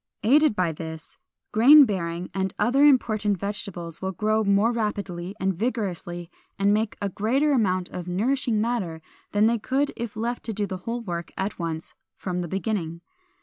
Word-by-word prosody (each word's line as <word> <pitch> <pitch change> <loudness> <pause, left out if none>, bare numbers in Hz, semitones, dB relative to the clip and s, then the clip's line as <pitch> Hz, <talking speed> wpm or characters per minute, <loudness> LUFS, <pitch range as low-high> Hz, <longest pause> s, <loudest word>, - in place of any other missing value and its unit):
Aided 285 +2 +5
by 180 -3 +1
this, 160 0 -8 0.3
grain 280 +7 +8
bearing 175 -4 -3
and 190 -1 -2
other 270 +4 +3
important 215 -7 +3
vegetables 180 -4 -5
will 190 0 -2
grow 215 +4 +1
more 200 +3 +3
rapidly 200 -5 -3
and 190 0 +1
vigorously, 180 -5 -3 0.3
and 200 +1 +3
make 215 0 0
a - - +1
greater 245 - +1
amount 185 -8 +1
of 180 -1 -6
nourishing 225 +4 0
matter, 205 -9 -2 0.3
than 205 +1 +3
they 230 +1 +2
could 270 +6 0
if 235 -2 -5
left 235 +3 -3
to 225 - -3
do 205 0 -1
the 190 -2 -5
whole 240 +1 -2
work 175 -6 -5
at 190 +1 -3
once 165 -1 -4 0.2
from 180 -1 -3
the 175 - -3
beginning. 185 -3 -3
205 Hz, 170 wpm, -25 LUFS, 180-230 Hz, 0.3 s, grain